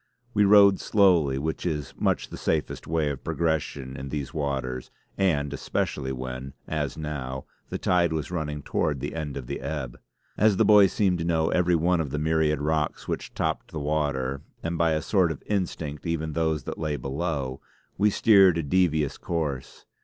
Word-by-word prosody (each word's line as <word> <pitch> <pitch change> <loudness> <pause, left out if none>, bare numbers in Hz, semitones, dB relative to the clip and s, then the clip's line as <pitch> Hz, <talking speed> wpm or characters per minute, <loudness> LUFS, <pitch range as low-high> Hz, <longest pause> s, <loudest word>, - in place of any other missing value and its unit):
We 105 -1 +4
rowed 100 -1 +7
slowly 85 -10 +3
which 80 +3 -3
is 75 -5 -3
much - - 0
the - - -7
safest - - -2
way 80 -2 +1
of 70 - -7
progression 75 -5 -2
in 70 0 -6
these 70 -2 -4
waters, 65 -4 -3 0.3
and 75 -7 +1
especially 65 -1 -2
when, 65 +1 -6
as 75 -4 -2
now, 65 -4 -5 0.2
the - - -3
tide 90 -2 +2
was 80 +1 -3
running 75 -4 -3
towards 75 -3 0
the 70 +3 -4
end 75 -4 -4
of 65 - -6
the - - -4
ebb. 70 -3 -4 0.4
As 105 -2 +4
the - - +4
boy 105 -2 +7
seemed 95 -3 +1
to - - -1
know 80 -1 +1
every 90 -1 +2
one 85 +1 +2
of 75 - -3
the 75 - -3
myriad 80 -1 +1
rocks 75 0 -1
which - - -4
topped - - -2
the 80 - -5
water, 70 -3 -1 0.2
and 85 +1 -2
by 85 -1 +2
a 80 - -1
sort 95 -5 +2
of 75 - -7
instinct 85 -6 -3
even 80 -2 -2
those 80 -3 0
that - - -6
lay 75 -2 -1
below, 70 -2 -3 0.3
we 105 +2 +3
steered 95 -4 +5
a 85 - -1
devious 75 -3 +1
course. 75 -6 -4
75 Hz, 185 wpm, -26 LUFS, 70-85 Hz, 0.4 s, rowed